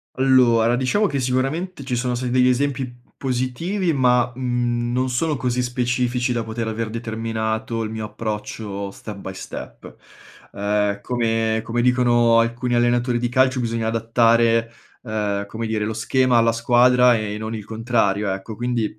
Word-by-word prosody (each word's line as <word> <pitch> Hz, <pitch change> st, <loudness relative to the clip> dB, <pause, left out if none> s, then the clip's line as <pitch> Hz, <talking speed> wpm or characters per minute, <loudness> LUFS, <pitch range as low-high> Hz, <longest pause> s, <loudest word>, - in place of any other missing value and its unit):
Allora, 120 Hz, -3 st, +4 dB
diciamo 130 Hz, +12 st, +1 dB
che 140 Hz, -5 st, -2 dB
sicuramente 135 Hz, +7 st, -2 dB
ci 130 Hz, -2 st, -2 dB
sono 125 Hz, 0 st, -1 dB
stati 125 Hz, +1 st, -3 dB
degli 125 Hz, 0 st, +4 dB
esempi 125 Hz, -2 st, -2 dB
positivi 140 Hz, +9 st, -1 dB
ma, 125 Hz, -3 st, +3 dB
mhmm, 120 Hz, -1 st, -1 dB
non 130 Hz, +1 st, 0 dB
sono 150 Hz, +4 st, 0 dB
così 125 Hz, -1 st, -1 dB
specifici 125 Hz, 0 st, -1 dB
da 115 Hz, -1 st, -1 dB
poter 110 Hz, 0 st, -4 dB
aver 110 Hz, 0 st, -3 dB
determinato 110 Hz, 0 st, -3 dB
il 110 Hz, -, -4 dB
mio 110 Hz, -1 st, -4 dB
approccio 105 Hz, -2 st, -5 dB
step 105 Hz, +1 st, -9 dB
by 95 Hz, -1 st, -7 dB
step -, -, -9 dB, 0.6 s
uhm, 100 Hz, 0 st, 0 dB
come 115 Hz, -1 st, 0 dB
come 120 Hz, +1 st, -1 dB
dicono 120 Hz, -2 st, +4 dB
alcuni 120 Hz, +2 st, 0 dB
allenatori 120 Hz, 0 st, +2 dB
di 120 Hz, 0 st, -1 dB
calcio 130 Hz, +1 st, +2 dB
bisogna 115 Hz, -2 st, -1 dB
adattare, 115 Hz, 0 st, +2 dB, 0.3 s
uhm, 105 Hz, -3 st, -2 dB
come 110 Hz, +3 st, -5 dB
dire, 110 Hz, -1 st, -1 dB
lo 110 Hz, -, -2 dB
schema 125 Hz, +2 st, +2 dB
alla 115 Hz, 0 st, +4 dB
squadra 125 Hz, +1 st, +4 dB
e 105 Hz, -1 st, -4 dB
non 110 Hz, +1 st, -5 dB
il 105 Hz, -2 st, -7 dB
contrario, 110 Hz, -3 st, 0 dB
ecco; 95 Hz, +3 st, -6 dB
quindi, 120 Hz, 0 st, -1 dB
120 Hz, 155 wpm, -21 LUFS, 110-125 Hz, 0.6 s, Allora